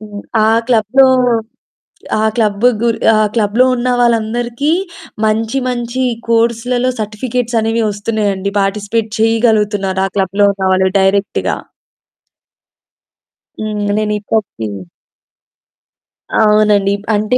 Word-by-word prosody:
హ్మ్. 205 -1 -9 0.2
ఆ - - +3 0.2
క్లబ్‌లో, 245 +3 +4 1.1
ఆ 220 - +1
క్లబ్, 215 -1 0 0.2
గు 235 - +2 0.3
ఆ - - +3 0.2
క్లబ్‌లో 225 +2 +2
ఉన్న 245 +1 -2
వాళ్ళందరికీ 240 +4 0 0.5
మంచి 225 +4 0
మంచి 245 +1 -3 0.3
కోర్స్‌లలో 235 +2 +1
సర్టిఫికేట్స్ 230 +2 -2
అనేవి 225 +1 0
వస్తున్నాయండి. 205 -2 -2
పార్టిసిపేట్ 210 +3 -1
చేయగలుగుతున్నారు, 210 -4 +1
ఆ - - -3
క్లబ్‌లో 195 +1 +2
ఉన్న 195 -1 -3
వాళ్ళు 190 0 +2
డైరెక్ట్‌గా. 195 +1 0 2.1
హ్మ్ 215 -1 -3 0.2
నేనిప్పటికి 210 - -2 1.7
అవునండి, 210 -2 +3
ఇప్ 205 - -16
అంటే 215 +4 +1
215 Hz, 95 wpm, -15 LUFS, 205-235 Hz, 2.1 s, క్లబ్‌లో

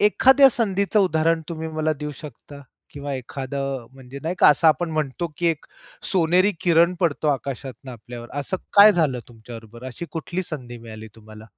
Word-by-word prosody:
एखाद्या 265 +6 +6
संधीचं 205 -3 +1
उदाहरण 165 -2 +2
तुम्ही 160 -1 -5
मला 155 0 -1
देऊ 150 0 -4
शकता 145 -1 -11 0.3
किंवा 145 -1 -5
एखादं 135 +1 -4
अ, 115 - -17
म्हणजे 135 +1 -11
नाही 170 +3 -2
का - - +7
असं 155 +2 +5
आपण 160 +3 +1
म्हणतो, 155 +1 -2
की 175 - -1
एक 165 -3 -1 0.5
सोनेरी 185 +3 +3
किरण 170 0 +3
पडतो 160 -3 0
आकाशातून 135 -1 -4
आपल्यावर, 120 +1 -10
असं 185 +7 -3 0.2
काय 205 +1 +9
झालं 150 -8 +1
तुमच्याबरोबर, 115 +1 -12
अशी 150 +7 -7
कुठली 175 +3 -4
संधी 125 -8 -8
मिळाली 110 -1 -10
तुम्हाला? 110 -1 -14
150 Hz, 165 wpm, -23 LUFS, 130-170 Hz, 0.5 s, काय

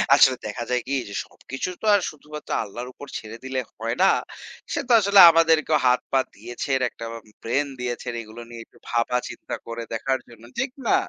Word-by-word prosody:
আসলে 135 -2 +6
দেখা 120 +3 -4
যায় 125 0 +1
কি 140 - -2 0.2
যে - - -8
সবকিছু 135 +7 -6
তো - - -5
আর 200 - +3
শুধুমাত্র 150 0 -11
আল্লাহর 120 +4 -7
উপর 145 - -11
ছেড়ে 110 +1 -8
দিলে 130 0 -2 0.2
হয় 115 +1 -2
না। 190 - +7 0.6
সে - - 0
তো - - -1
আসলে 200 -1 +5
আমাদেরকেও 160 -1 +4
হাত-পা 125 +2 +3 0.2
দিয়েছে, 120 +6 -5 0.2
একটা 115 - -9 0.4
ব্রেইন 135 +5 +1
দিয়েছে। 125 0 -4
এগুলো 110 +1 -10
নিয়ে 115 -1 -8
একটু - - -24
ভাবা-চিন্তা 120 +1 -1
করে 115 0 -5
দেখার 130 +4 0
জন্য। 115 -1 -16 0.2
ঠিক 260 0 0 0.2
না? - - +5
125 Hz, 180 wpm, -24 LUFS, 115-150 Hz, 0.6 s, না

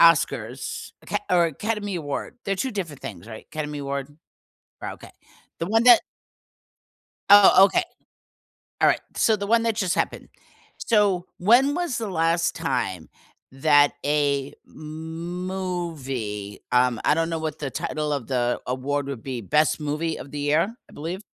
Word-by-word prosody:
Oscars 135 -7 +2
Aca - - -2
or 175 -1 +5
Academy 205 +5 -3
Award 145 -4 -4
they're 195 0 -1
2 265 +7 -1
different 165 -9 -5
things, 95 +1 -8
right? 110 -1 -10
Academy 150 -1 -4
Award? 140 -1 -3 0.7
Ri - - -4
okay, - - -12 0.5
the 165 - -2
one 225 +3 +3
that 245 -2 +9 1.3
Oh, 200 -1 +9
okay. 195 - +3 1.0
Alright, - - +4
so 220 - +3
the 200 -1 -4
one 230 +1 +3
that 230 -2 0
just 190 -5 0
happened. - - -2 0.5
So, 205 -5 +2
when 245 +9 +4
was 340 -6 -2
the 225 -3 -3
last 165 -1 +1
time 125 - -2 0.4
that 145 +1 +4
a 145 -1 +1
movie, 160 - -5
um 125 -2 +3
I - - +5
don't 165 +1 0
know 165 -1 -2
what 155 -1 -4
the 140 -3 -4
title 150 -1 -3
of 140 -5 -2
the 120 -2 0
award 135 +3 -2
would 135 -5 -6
be, 130 -3 -4
Best 150 +11 +2
Movie 155 +2 -2
of 135 - -9
the 150 - -5
Year, 155 +9 +1
I - - -16
believe? 170 +6 -5
155 Hz, 150 wpm, -24 LUFS, 140-185 Hz, 1.3 s, that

